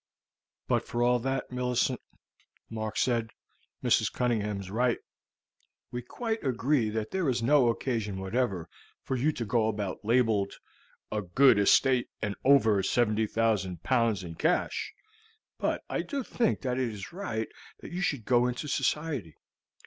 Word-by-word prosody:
"But -, -, +1 dB
for 120 Hz, 0 st, 0 dB
all 125 Hz, 0 st, +3 dB
that, 135 Hz, +1 st, -2 dB
Millicent," 125 Hz, 0 st, 0 dB, 0.7 s
Mark 110 Hz, -1 st, -4 dB
said, 115 Hz, -3 st, +1 dB, 0.5 s
"Mrs. -, -, +3 dB
Cunningham 105 Hz, -5 st, 0 dB
is 95 Hz, -1 st, -8 dB
right. 120 Hz, +2 st, +2 dB, 0.9 s
We 125 Hz, -, -3 dB
quite 225 Hz, -, -4 dB
agree 130 Hz, -2 st, +1 dB
that 110 Hz, 0 st, -3 dB
there 185 Hz, -6 st, 0 dB
is 120 Hz, -2 st, 0 dB
no 135 Hz, 0 st, +5 dB
occasion 115 Hz, -5 st, -2 dB
whatever 95 Hz, -2 st, -1 dB, 0.4 s
for 130 Hz, -, -2 dB
you 140 Hz, +5 st, +2 dB
to 120 Hz, -, -4 dB
go 110 Hz, 0 st, +2 dB
about 105 Hz, -3 st, -3 dB
labeled 110 Hz, -3 st, +2 dB, 0.6 s
'A 105 Hz, 0 st, -1 dB
good 115 Hz, +4 st, +5 dB
estate 125 Hz, +5 st, +4 dB
and 105 Hz, -2 st, -2 dB
over 115 Hz, -7 st, +5 dB
70,000 110 Hz, -5 st, +1 dB
pounds 115 Hz, -4 st, +2 dB
in 85 Hz, -2 st, -7 dB
cash,' 160 Hz, -, 0 dB, 0.7 s
but -, -, -1 dB
I -, -, -1 dB
do 280 Hz, -3 st, -3 dB
think 230 Hz, -1 st, 0 dB
that 125 Hz, -1 st, -1 dB
it 130 Hz, -2 st, 0 dB
is 100 Hz, +4 st, -8 dB
right 115 Hz, -, -3 dB, 0.3 s
that -, -, -9 dB
you 180 Hz, +2 st, -3 dB
should 140 Hz, -, -1 dB
go 125 Hz, -1 st, +4 dB
into 125 Hz, +4 st, -3 dB
society. 140 Hz, -, -1 dB
120 Hz, 150 wpm, -29 LUFS, 105-130 Hz, 0.9 s, no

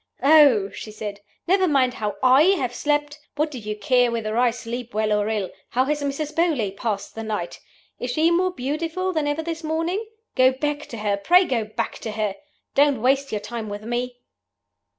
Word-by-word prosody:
'Oh,' 275 Hz, -9 st, +6 dB
she -, -, -8 dB
said, 210 Hz, -1 st, -6 dB, 0.3 s
'never 375 Hz, +1 st, +3 dB
mind 265 Hz, -5 st, +2 dB
how 210 Hz, -4 st, -3 dB
I 260 Hz, +2 st, +6 dB, 0.2 s
have 250 Hz, -5 st, -2 dB
slept! 295 Hz, +2 st, -1 dB, 0.2 s
What 300 Hz, +1 st, 0 dB
do 260 Hz, -, -6 dB
you 210 Hz, -1 st, -4 dB
care 245 Hz, -1 st, +3 dB
whether 220 Hz, -2 st, -2 dB
I 245 Hz, +1 st, +4 dB
sleep 235 Hz, 0 st, -6 dB
well 215 Hz, 0 st, +1 dB
or 210 Hz, 0 st, +1 dB
ill? 210 Hz, -4 st, -2 dB, 0.2 s
How 255 Hz, +2 st, +1 dB
has 295 Hz, +1 st, -1 dB
Mrs. 285 Hz, +2 st, -3 dB
Beauly 305 Hz, -, +1 dB
passed 205 Hz, -2 st, -3 dB
the 225 Hz, -, -6 dB
night? 210 Hz, -6 st, -4 dB, 0.4 s
Is 245 Hz, -, -3 dB
she 315 Hz, +7 st, +2 dB
more 365 Hz, +2 st, +2 dB
beautiful 330 Hz, +6 st, -2 dB
than 310 Hz, -3 st, 0 dB
ever 290 Hz, +2 st, -1 dB
this 330 Hz, 0 st, -5 dB
morning? 330 Hz, +6 st, -1 dB, 0.3 s
Go 255 Hz, 0 st, +4 dB
back 295 Hz, +2 st, -3 dB
to 235 Hz, -, -8 dB
her 205 Hz, -2 st, 0 dB
pray 355 Hz, -, +5 dB
go 235 Hz, -8 st, -1 dB
back 220 Hz, +2 st, -4 dB
to 220 Hz, -, -5 dB
her! 210 Hz, -2 st, -1 dB, 0.4 s
Don't 280 Hz, -3 st, +4 dB
waste 275 Hz, +2 st, +2 dB
your 210 Hz, -, -2 dB
time 220 Hz, +1 st, -5 dB
with 205 Hz, +1 st, -6 dB
me! 245 Hz, +2 st, -3 dB
255 Hz, 195 wpm, -23 LUFS, 220-300 Hz, 0.4 s, Oh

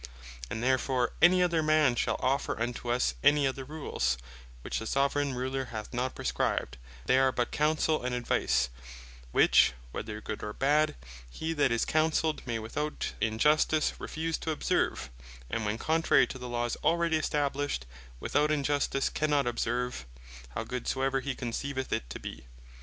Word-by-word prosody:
When 110 Hz, -, -4 dB
therefore 130 Hz, 0 st, +1 dB
any 180 Hz, +2 st, +6 dB
other 170 Hz, -2 st, +2 dB
man 155 Hz, -4 st, +4 dB
shall -, -, 0 dB
offer 135 Hz, -3 st, 0 dB
unto 120 Hz, +1 st, -3 dB
us 120 Hz, -, +2 dB
any 145 Hz, -1 st, +5 dB
other 135 Hz, 0 st, -2 dB
Rules, 130 Hz, -, -2 dB, 0.5 s
which -, -, -2 dB
the 110 Hz, -, -5 dB
Soveraign 140 Hz, +1 st, +1 dB
Ruler 130 Hz, +1 st, -2 dB
hath 110 Hz, -3 st, -7 dB
not 125 Hz, +1 st, -2 dB
prescribed, -, -, -1 dB, 0.3 s
they 130 Hz, -, +4 dB
are 135 Hz, 0 st, +4 dB
but 120 Hz, -1 st, -1 dB
Counsell, 155 Hz, +1 st, +1 dB
and 125 Hz, 0 st, -2 dB
Advice; 65 Hz, -, +1 dB, 0.6 s
which, -, -, +5 dB, 0.2 s
whether 105 Hz, -, -5 dB
good, 110 Hz, 0 st, -6 dB
or 105 Hz, -, -5 dB
bad, 150 Hz, -, +2 dB, 0.3 s
hee 160 Hz, -, -3 dB
that 145 Hz, -5 st, +2 dB
is 115 Hz, -1 st, +1 dB
counselled, 155 Hz, 0 st, +1 dB
may 120 Hz, -1 st, -1 dB
without 145 Hz, +8 st, -3 dB
injustice 150 Hz, +7 st, +3 dB
refuse 160 Hz, +1 st, -3 dB
to -, -, -4 dB
observe, 155 Hz, -, 0 dB, 0.4 s
and 110 Hz, -2 st, -1 dB
when 105 Hz, +2 st, -1 dB
contrary 160 Hz, +6 st, +3 dB
to 130 Hz, -, -8 dB
the 125 Hz, 0 st, -6 dB
Laws 120 Hz, 0 st, -1 dB
already 170 Hz, -1 st, +2 dB
established, 145 Hz, -, -1 dB, 0.3 s
without 150 Hz, +1 st, +1 dB
injustice 145 Hz, -2 st, +1 dB
cannot 150 Hz, -2 st, +1 dB
observe, 120 Hz, -, -2 dB, 0.5 s
how 110 Hz, -, -1 dB
good 125 Hz, +1 st, -5 dB
soever 135 Hz, 0 st, +1 dB
he 135 Hz, 0 st, -3 dB
conceiveth 130 Hz, +2 st, -3 dB
it -, -, -2 dB
to -, -, -6 dB
be. -, -, -8 dB
135 Hz, 160 wpm, -30 LUFS, 120-150 Hz, 0.6 s, any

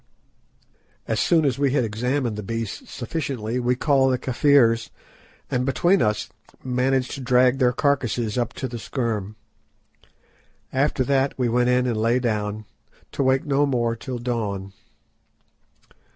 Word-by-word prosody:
As -, -, 0 dB
soon 165 Hz, -3 st, +3 dB
as 135 Hz, -1 st, 0 dB
we 140 Hz, -2 st, +2 dB
had 140 Hz, -, +2 dB
examined 120 Hz, +2 st, -1 dB
the 105 Hz, -, -5 dB
beasts 115 Hz, +1 st, -5 dB
sufficiently 125 Hz, -3 st, -3 dB
we 125 Hz, 0 st, +1 dB
called 135 Hz, -1 st, +3 dB
the 130 Hz, -, +1 dB
Kafirs, 120 Hz, -3 st, +3 dB, 0.6 s
and 125 Hz, 0 st, +1 dB
between 175 Hz, +8 st, +2 dB
us 105 Hz, -, 0 dB, 0.4 s
managed 130 Hz, 0 st, 0 dB
to 140 Hz, -, -6 dB
drag 125 Hz, +1 st, +3 dB
their 125 Hz, -2 st, +4 dB
carcases 125 Hz, -5 st, 0 dB
up 120 Hz, -2 st, -1 dB
to 130 Hz, -, -4 dB
the 120 Hz, -1 st, -7 dB
scherm. 110 Hz, -5 st, -3 dB, 1.4 s
After 135 Hz, 0 st, +1 dB
that 135 Hz, +1 st, +1 dB
we 125 Hz, -2 st, +1 dB
went 120 Hz, +1 st, +2 dB
in 125 Hz, 0 st, +2 dB
and 120 Hz, -3 st, -1 dB
lay 115 Hz, +3 st, +2 dB
down, 110 Hz, -3 st, -2 dB, 0.5 s
to -, -, -3 dB
wake 130 Hz, 0 st, +2 dB
no 145 Hz, 0 st, +2 dB
more 120 Hz, -3 st, 0 dB
till 125 Hz, +2 st, -6 dB
dawn. 105 Hz, -5 st, -3 dB
125 Hz, 145 wpm, -23 LUFS, 115-135 Hz, 1.4 s, their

